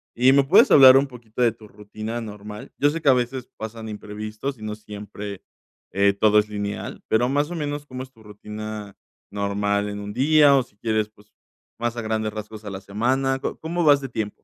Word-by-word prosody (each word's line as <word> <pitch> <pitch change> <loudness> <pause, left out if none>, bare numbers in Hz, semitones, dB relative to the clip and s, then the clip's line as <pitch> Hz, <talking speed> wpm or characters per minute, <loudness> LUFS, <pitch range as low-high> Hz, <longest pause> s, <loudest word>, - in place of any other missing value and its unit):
y 130 +3 +5
me 140 0 +5
puedes 135 - +5
hablar 135 -2 +9
un 140 - +3
poquito 120 -2 -8
de 115 - +4
tu 110 -1 -15
rutina 110 +3 -7
normal. 105 -1 -9
Yo 145 - +4
sé 165 +2 -3
que 140 - +3
a - - +8
veces 125 0 -2
pasan 110 0 -7
imprevistos 105 +5 -6
y 110 - -12
no 105 0 -3
siempre, 105 -1 -8 0.5
eh, 100 0 +3
todo 105 +1 +4
es 105 0 -1
lineal, 100 -1 -5
pero 120 +3 +2
más 145 +4 0
o - - -4
menos 145 -1 -4
¿cómo 130 -2 -7
es 130 - -14
tu 115 -3 -20
rutina 105 0 -8 0.3
normal 100 0 -1
en 100 0 -5
un 105 0 -6
día?, 145 +1 +5
o 130 - +2
si 105 - -26
quieres, 110 -1 -1
pues 105 -1 -24 0.5
más 120 0 -1
a - - -2
grandes 110 -1 -2
rasgos 110 0 -8
a - - -4
la 95 0 -6
semana. 130 +7 0
¿Co - - -4
cómo 170 +2 -2
vas 145 -2 +5
de 135 - -6
tiempo? 110 -3 -3
110 Hz, 215 wpm, -23 LUFS, 105-130 Hz, 0.5 s, hablar